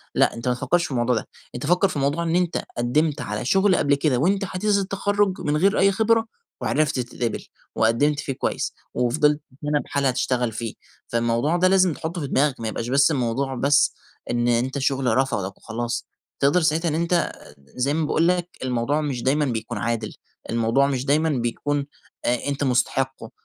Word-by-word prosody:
لأ، - - +3
أنت 115 +1 -6
ما 125 - +3
تفكرش 135 +8 +1
في - - -7
الموضوع 120 0 +1
ده، 110 - -3 0.3
أنت 125 - -4
فكر 180 +5 +3
في 185 - -6
الموضوع 145 +4 0
إن 165 +1 0
أنت 180 -1 0
قدّمت 145 +6 +1
على 105 +3 -4
شغل 190 +4 +3
قبل 140 -3 +3
كده 140 -3 +1
وأنت 195 +7 +1
حديث 200 +3 0
التخرج 200 0 0
من 150 +1 0
غير 195 +5 +3
أي 195 +1 +5
خبرة 225 +2 +2 0.4
وعرفت 150 -3 +1
تتقبل، 120 -1 -3 0.3
وقدّمت 140 +7 +2
فيه 135 - -3
كويس - - -2 0.2
وفضلت 150 +5 +2 0.2
سَنَة 150 0 +1
بحالها 140 -2 0
تشتغل 125 -1 0
فيه، 115 0 -5 0.3
فالموضوع 120 +8 +1
ده 185 +1 +4
لازم 185 -3 +4
تحطه 165 +2 -5
في 140 - -3
دماغك، 135 -1 +1
ما 115 - -3
يبقاش 115 +2 -3
بس 140 +3 +4
الموضوع 130 0 -1
بس 140 +3 +3 0.4
إن 120 0 +1
أنت 120 +3 +1
شغل 130 -3 +1
رفضك 100 -8 -1
وخلاص. 120 +1 -4 0.3
تقدر 145 +6 +3
ساعتها 160 +1 +1
إن 150 - -1
أنت 170 +1 +1 0.3
زي 125 - -3
ما 160 -1 0
باقول 165 +3 +2
لك 180 -1 +1
الموضوع 130 +4 0
مش 135 -5 -3
دايمًا 145 +3 +2
بيكون 115 -2 -3
عادل، 115 0 -2 0.4
الموضوع 115 +4 +2
مش 135 -1 -2
دايمًا 155 +3 +2
بيكون 140 +2 -1 0.4
أ 125 +3 0
أنت 140 0 -2
مستحقه، 130 0 0
140 Hz, 180 wpm, -23 LUFS, 120-160 Hz, 0.4 s, أي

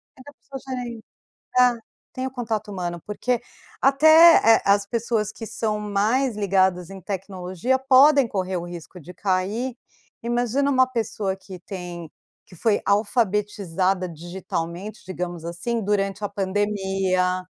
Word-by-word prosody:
Nem 260 - -15
dá 290 - -11
pra 275 -1 -10
sugerir 245 -4 -6 0.6
é, 250 -1 +5 0.4
tem 255 0 -3
o - - -7
contato 220 -4 -3
humano, 175 -3 -4
porque 240 +4 -1 0.4
até, 315 -3 +7
eh, - - -5
as 200 0 +3
pessoas 225 -1 -1
que 225 - -8
são 215 -1 -2
mais 215 +5 0
ligadas 190 -3 +1
em 195 -1 -9
tecnologia, 190 +4 -2
podem 270 0 +6
correr 190 -3 -2
o 170 - -4
risco 175 +1 -9
de 180 +2 -12
cair, 205 +7 -1 0.5
imagina 245 +4 0
uma 260 -1 +4
pessoa 220 -5 -2
que 190 -1 -11
tem 175 -3 -8 0.3
que 180 - -16
foi 210 +4 +1
alfabetizada 200 -4 0
digitalmente, 175 +3 -6
digamos 175 -2 -5
assim, 200 +8 -3
durante 195 0 -1
a 205 - -1
pandemia, 190 -2 0
205 Hz, 135 wpm, -23 LUFS, 185-235 Hz, 0.6 s, até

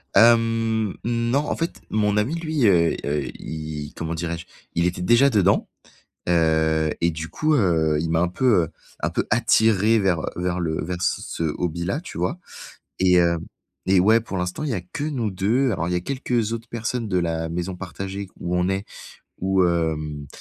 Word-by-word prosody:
Hem, 115 -1 +4
non, 120 +3 +1
en 150 - -2
fait, 165 +1 -4
mon 105 -1 +1
ami 120 +10 +1
lui, 155 -6 0
heu 85 -4 +4
heu, 70 -1 -1
i 75 -2 -6
comment 80 0 -3
dirais-je? 85 +1 -4 0.3
Il 85 +1 +2
était 90 0 -1
déjà 120 +9 +5
dedans, 100 -5 +3 0.6
heu 80 -2 +2
et 85 0 +3
du 80 0 -5
coup, 155 - +1
heu, 80 - +2
il 80 - -2
m'a 80 0 +2
un 90 - +2
peu, 105 0 +3
heu, - - -7 0.3
un - - 0
peu - - -1
attiré 110 -1 +4
vers, 95 -5 +1
heu, - - -3
vers 90 0 -1
le 80 -2 -1
vers 90 +2 -4
c - - 0
ce - - -4 0.2
hobby-là, 90 - -2
tu 175 - -9
vois? 175 - -1 0.6
Et 90 -1 +4
hem, 85 -1 +3 0.5
et 95 0 +4
ouais, 110 +5 +5
pour 100 -3 -6
l'instant, 90 +9 -3
il 145 - -2
y - - 0
a 95 - -2
que 90 +11 -6
nous 130 -8 -1
2, 110 +8 +1
alors 85 -2 -2
il - - -1
y - - 0
a - - 0
quelques 120 0 -1
autres 115 +1 -5
personnes 115 0 -3
de 95 - +1
la 80 -1 -1
maison 90 +2 -3
partagée 95 +2 -6
où 90 0 -2
on 90 +1 +1
est, 95 +1 -1 0.6
où,,, 95 0 +2
hem, 80 -4 -1
95 Hz, 195 wpm, -23 LUFS, 85-115 Hz, 0.6 s, déjà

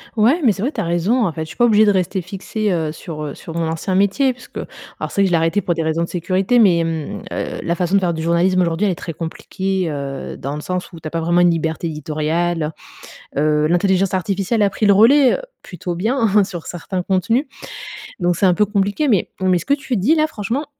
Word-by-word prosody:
Ouais, 240 +10 +3
mais 240 - +5
c'est 195 - -4
vrai, 260 +7 0
tu - - -3
as - - -2
raison. 175 +8 +1
En 180 - 0
fait, 160 - -5
je 160 - -4
suis - - -10
pas 240 - +4
obligée 215 -2 +5
de 205 - +4
rester 190 0 0
fixée, 195 +3 -3
heu, 160 -3 -1
sur, 155 -1 -7
heu, 145 -2 -4
sur 165 - -9
mon 165 -1 0
ancien 165 +4 -2
métier 200 +8 +2
puisque 255 - -13 0.4
alors - - -4
c'est 200 - +1
que - - +4
je - - -2
l'ai 170 - +4
arrêté 165 +5 +1
pour 175 - 0
des 165 -1 -2
raisons 160 +1 0
de - - -3
sécurité. 185 +7 +1
Mais, 180 -7 +5
mmh, 160 -3 -4
heu, - - -4
la 170 - 0
façon 180 +1 0
de - - +6
faire 180 -3 0
du 160 - -4
journalisme 170 +3 +2
aujourd'hui, 170 +3 +1
elle 200 - +2
est - - -2
très 165 - -6
compliquée, 185 +3 -3
heu, 140 -2 -5
dans 140 +2 -4
le 150 - -5
sens 180 +3 -4
où 165 - -9
tu 160 - -7
as - - -4
pas 165 - -1
vraiment 170 +2 +2
une 175 - +5
liberté 160 0 -2
éditoriale, 155 +1 -1 0.7
heu, 150 +1 +2
l'intelligence 190 +3 +2
artificielle 195 +4 0
a 200 - +3
pris 210 - -1
le 200 - +6
relais, 250 +7 +6
heu, - - -3 0.2
plutôt 180 0 -5
bien 215 +1 +2
sur 175 -4 -7
certains 180 +1 -4
contenus, 225 - +1 0.7
donc 175 -1 +1
c'est 195 - +1
un 180 - +5
peu 210 +4 +2
compliqué, 205 +7 0
mais 210 -8 +2
mais 185 -1 +3
ce - - -9
que 280 - +2
tu 270 -4 -2
dis 235 - +3
là 310 -1 +3
franchement, 250 0 -3
185 Hz, 250 wpm, -19 LUFS, 165-205 Hz, 0.7 s, de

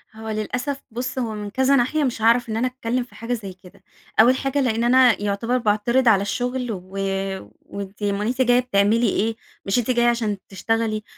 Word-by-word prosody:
هو 220 0 -7
للأسف 250 +6 -3
بُص، 255 +3 -4
هو 225 -3 -2
من 210 -1 -5
كذا 265 +5 +2
ناحية 275 +4 +1
مش 245 -4 -2
هاعرف 235 +1 +3
إن 220 - -2
أنا 245 +3 +1
أتكلم 250 -1 -2
في 245 - -18
حاجة 230 +2 -4
زي 205 -5 -5
كده. 190 +1 -17 0.4
أول 240 +4 +7
حاجة 275 +1 -1
لأن 230 -3 0
أنا 245 -2 +5
يعتبر 210 +5 0
باعترض 235 +3 +1
على 205 -4 +5
الشغل، 245 +4 -2
و 200 - -4 0.9
وأنتِ 200 +1 -8
أمّال 205 +1 0
أنتِ 255 +2 -1
جاية 245 -1 +4
بتعملي 225 -1 +2
إيه؟ 220 +3 0 0.3
مش 195 +5 +1
أنتِ 245 +1 0
جاية 240 -1 +2
عشان 225 -4 0
تشتغلي؟! 220 +2 -1
230 Hz, 195 wpm, -22 LUFS, 215-250 Hz, 0.9 s, أول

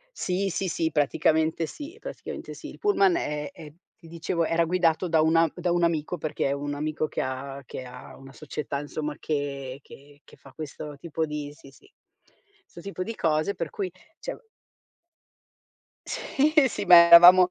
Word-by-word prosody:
Sì, 190 +2 -1
sì, 190 +2 -2
sì, 165 -1 -1
praticamente 160 +2 +1
sì, 300 - -8
praticamente - - -8
sì. - - -9
Il - - -11
pullman 200 - +3
è 150 +2 -3
è 160 -6 -12 0.3
ti 165 - -13
dicevo, 170 0 -2
era 165 +1 +2
guidato 175 0 +1
da 160 -1 +3
una 165 0 +3
da 175 -1 -1
un 175 -1 +2
amico, 165 +1 -1
perché 155 -3 -2
è - - 0
un 145 +1 -3
amico 155 +1 -2
che - - -3
ha 135 +1 -5
che 130 - -8
ha 125 - -11
una 135 0 -13
società, 150 -1 -5
insomma, 150 +1 -5
che 140 -3 -4
che 145 +1 -16
che - - -19
fa 135 - -17
questo 150 -1 -8
tipo 160 +1 -3
di 150 -1 -5
sì, 140 -3 -16
sì, 405 - -22 0.8
'sto 170 - -13
tipo 195 -2 -5
di 225 +4 -5
cose 155 +3 0
per 165 -4 -4
cui, 190 -3 -4 0.3
cioè - - -6 1.7
Sì, 295 +3 0
sì, 235 - -3
ma 175 - +9
eravamo 180 +2 +9
160 Hz, 175 wpm, -26 LUFS, 145-175 Hz, 1.7 s, ma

